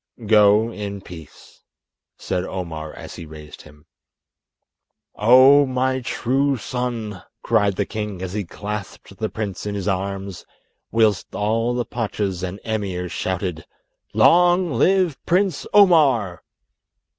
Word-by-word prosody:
"Go 105 Hz, +1 st, +4 dB
in 100 Hz, -2 st, -6 dB
peace," 80 Hz, -5 st, -14 dB, 0.6 s
said 90 Hz, -1 st, -3 dB
Omar 80 Hz, -5 st, -6 dB
as -, -, -10 dB
he 80 Hz, -, -9 dB
raised 75 Hz, -1 st, -12 dB
him. 75 Hz, 0 st, -18 dB, 1.3 s
"Oh, 130 Hz, +6 st, +6 dB
my 130 Hz, 0 st, 0 dB
true 135 Hz, +3 st, 0 dB
son!" 115 Hz, -6 st, -4 dB, 0.2 s
cried 105 Hz, -4 st, +2 dB
the 100 Hz, -, -1 dB
king 105 Hz, -3 st, -5 dB
as 95 Hz, 0 st, -5 dB
he 105 Hz, 0 st, -2 dB
clasped 100 Hz, +1 st, -7 dB
the 110 Hz, -1 st, -2 dB
prince 105 Hz, -2 st, -5 dB
in 105 Hz, -, -3 dB
his 100 Hz, 0 st, -4 dB
arms, 95 Hz, 0 st, -3 dB, 0.5 s
whilst 110 Hz, -4 st, +1 dB
all 115 Hz, +3 st, 0 dB
the 120 Hz, -1 st, -1 dB
pachas 105 Hz, -5 st, -3 dB
and 95 Hz, +2 st, -5 dB
emirs 95 Hz, -5 st, -3 dB
shouted, 90 Hz, -3 st, -3 dB, 0.5 s
"Long 175 Hz, 0 st, +4 dB
live 180 Hz, +4 st, +2 dB
Prince 180 Hz, -2 st, +1 dB
Omar!" 145 Hz, -, +4 dB
105 Hz, 120 wpm, -21 LUFS, 95-125 Hz, 1.3 s, Oh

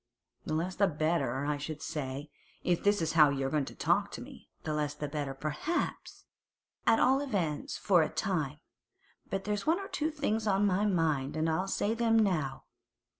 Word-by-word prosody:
'The 155 Hz, -, 0 dB
less 175 Hz, +4 st, -1 dB
the 200 Hz, +2 st, +3 dB
better, 155 Hz, -5 st, 0 dB
I 150 Hz, 0 st, 0 dB
should 150 Hz, +1 st, -5 dB
say, 145 Hz, 0 st, -5 dB, 0.3 s
if 175 Hz, -1 st, +1 dB
this 205 Hz, -3 st, +3 dB
is 160 Hz, -, -1 dB
how 155 Hz, -3 st, +7 dB
you're 135 Hz, -1 st, -1 dB
going 150 Hz, -3 st, +1 dB
to -, -, -9 dB
talk 195 Hz, +5 st, +2 dB
to -, -, -6 dB
me.' 260 Hz, +1 st, -12 dB
'The 155 Hz, -, -2 dB
less 150 Hz, -1 st, -1 dB
the 150 Hz, -, -4 dB
better, 145 Hz, -2 st, -3 dB
perhaps—at 225 Hz, -, -3 dB
all 265 Hz, +2 st, +4 dB
events 180 Hz, -, -2 dB
for 180 Hz, -4 st, +4 dB
a 155 Hz, -, +1 dB
time. 175 Hz, -10 st, -1 dB, 0.7 s
But 195 Hz, +1 st, -2 dB
there's 210 Hz, +5 st, -2 dB
one 330 Hz, +4 st, +3 dB
or 390 Hz, -, -6 dB
two 310 Hz, +1 st, -1 dB
things 225 Hz, -8 st, -1 dB
on 200 Hz, 0 st, +3 dB
my 200 Hz, +1 st, +2 dB
mind, 155 Hz, -6 st, +1 dB
and 160 Hz, +1 st, +1 dB
I'll 165 Hz, +4 st, 0 dB
say 205 Hz, +2 st, 0 dB
them 230 Hz, -1 st, +3 dB
now. 160 Hz, -11 st, +1 dB
170 Hz, 185 wpm, -31 LUFS, 150-205 Hz, 0.7 s, how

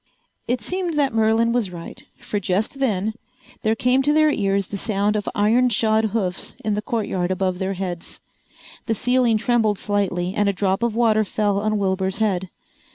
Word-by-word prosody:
It 245 Hz, 0 st, 0 dB
seemed 360 Hz, -3 st, -2 dB
that 280 Hz, -4 st, +1 dB
Merlin 225 Hz, +1 st, +3 dB
was 235 Hz, -5 st, 0 dB
right, 170 Hz, -2 st, -9 dB, 0.2 s
for 205 Hz, -, -3 dB
just 205 Hz, +7 st, -1 dB
then 215 Hz, -5 st, 0 dB, 0.5 s
there 220 Hz, 0 st, +1 dB
came 250 Hz, +3 st, +2 dB
to 290 Hz, +2 st, +2 dB
their 310 Hz, 0 st, +4 dB
ears 195 Hz, -4 st, 0 dB
the 200 Hz, -, -4 dB
sound 210 Hz, 0 st, 0 dB
of 205 Hz, -1 st, -1 dB
iron 230 Hz, +5 st, +3 dB
shod 220 Hz, 0 st, +2 dB
hoofs 195 Hz, -4 st, -2 dB
in 215 Hz, -, +1 dB
the 210 Hz, -, -1 dB
courtyard 210 Hz, -7 st, -2 dB
above 185 Hz, -1 st, -1 dB
their 190 Hz, 0 st, -1 dB
heads. 180 Hz, -2 st, -5 dB, 0.7 s
The 225 Hz, -, +1 dB
ceiling 245 Hz, 0 st, +2 dB
trembled 220 Hz, -2 st, +1 dB
slightly 190 Hz, -3 st, -1 dB
and 205 Hz, -1 st, +1 dB
a -, -, 0 dB
drop 190 Hz, +1 st, 0 dB
of 235 Hz, -2 st, 0 dB
water 220 Hz, -2 st, +3 dB
fell 205 Hz, 0 st, 0 dB
on 215 Hz, +1 st, 0 dB
Wilbur's 190 Hz, -1 st, 0 dB
head. 190 Hz, -4 st, 0 dB
215 Hz, 180 wpm, -22 LUFS, 195-230 Hz, 0.7 s, their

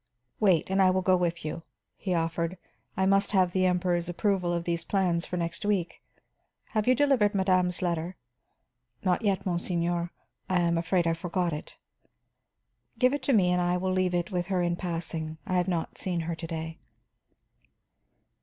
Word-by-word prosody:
"Wait 190 Hz, -6 st, +3 dB
and 195 Hz, 0 st, +3 dB
I 185 Hz, -, +6 dB
will 185 Hz, 0 st, +1 dB
go 185 Hz, 0 st, +4 dB
with 170 Hz, -2 st, -1 dB
you," 155 Hz, -, -4 dB, 0.3 s
he 185 Hz, -3 st, -2 dB
offered. 165 Hz, +2 st, -1 dB, 0.4 s
"I 190 Hz, -, +2 dB
must 195 Hz, +2 st, +2 dB
have 185 Hz, -2 st, +4 dB
the 185 Hz, 0 st, +2 dB
Emperor's 180 Hz, -1 st, 0 dB
approval 180 Hz, -1 st, 0 dB
of 170 Hz, -1 st, -1 dB
these 170 Hz, -1 st, -2 dB
plans 180 Hz, -3 st, 0 dB
for 180 Hz, -, -3 dB
next 170 Hz, -1 st, -3 dB
week. 200 Hz, -5 st, -1 dB, 0.7 s
Have 215 Hz, -2 st, -1 dB
you 255 Hz, -, +5 dB
delivered 250 Hz, -7 st, +3 dB
madame's 185 Hz, -2 st, +2 dB
letter?" 170 Hz, +1 st, -1 dB, 0.9 s
"Not 185 Hz, +1 st, +2 dB
yet, 200 Hz, -4 st, 0 dB
monseigneur. 175 Hz, -1 st, 0 dB, 0.4 s
I 185 Hz, -1 st, +2 dB
am 170 Hz, 0 st, +2 dB
afraid 170 Hz, +1 st, +1 dB
I 165 Hz, -, +2 dB
forgot 175 Hz, 0 st, -1 dB
it." 150 Hz, -, -7 dB, 1.2 s
"Give 255 Hz, +1 st, +3 dB
it 285 Hz, -, -1 dB
to 270 Hz, -, +1 dB
me 185 Hz, -5 st, +4 dB
and 180 Hz, 0 st, +2 dB
I 175 Hz, 0 st, +1 dB
will 185 Hz, +1 st, -1 dB
leave 185 Hz, -1 st, +1 dB
it 175 Hz, +2 st, -1 dB
with 175 Hz, -1 st, -1 dB
her 185 Hz, -2 st, +1 dB
in 175 Hz, 0 st, +1 dB
passing. 165 Hz, -3 st, -4 dB
I 185 Hz, -4 st, 0 dB
have 180 Hz, 0 st, +1 dB
not 170 Hz, -3 st, -2 dB
seen 175 Hz, -3 st, -1 dB
her 165 Hz, +1 st, -3 dB
to 165 Hz, 0 st, -6 dB
day." 160 Hz, 0 st, -5 dB
180 Hz, 180 wpm, -28 LUFS, 170-190 Hz, 1.2 s, I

